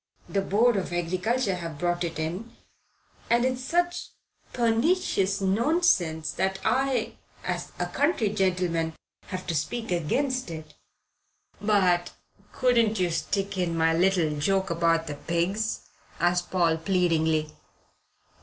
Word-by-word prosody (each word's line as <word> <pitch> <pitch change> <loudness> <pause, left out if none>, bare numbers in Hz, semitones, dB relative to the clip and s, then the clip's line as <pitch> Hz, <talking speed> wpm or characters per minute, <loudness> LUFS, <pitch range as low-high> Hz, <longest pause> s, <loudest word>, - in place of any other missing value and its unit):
The 200 - 0
Board 215 +4 +3
of 185 - -3
Agriculture 185 +6 0
have 165 -4 -5
brought 175 +2 0
it 165 -2 -3
in, 175 +9 -4 0.7
and 235 +1 +3
it's 255 0 -1
such 350 +5 0 0.4
pernicious 230 - +1
nonsense 195 - +2
that 190 0 -1
I, 255 0 +1 0.3
as - - -3
a - - -1
county 285 - +1
gentleman, 180 -5 0 0.3
have 185 -1 -5
to 170 - -2
speak 225 - -2
against 255 - 0
it." 160 -2 -8 0.9
"But 185 -4 +2 0.4
couldn't 235 -5 +2
you 180 -2 +1
stick 195 +3 -2
in 170 -2 0
my 165 0 +3
little 170 -4 +2
joke 190 +4 +1
about 165 -1 +2
the 150 - -4
pigs?" 175 +8 -1 0.4
asked 175 0 +1
Paul 170 -3 +2
pleadingly. 160 -3 +1
185 Hz, 125 wpm, -26 LUFS, 170-225 Hz, 0.9 s, Board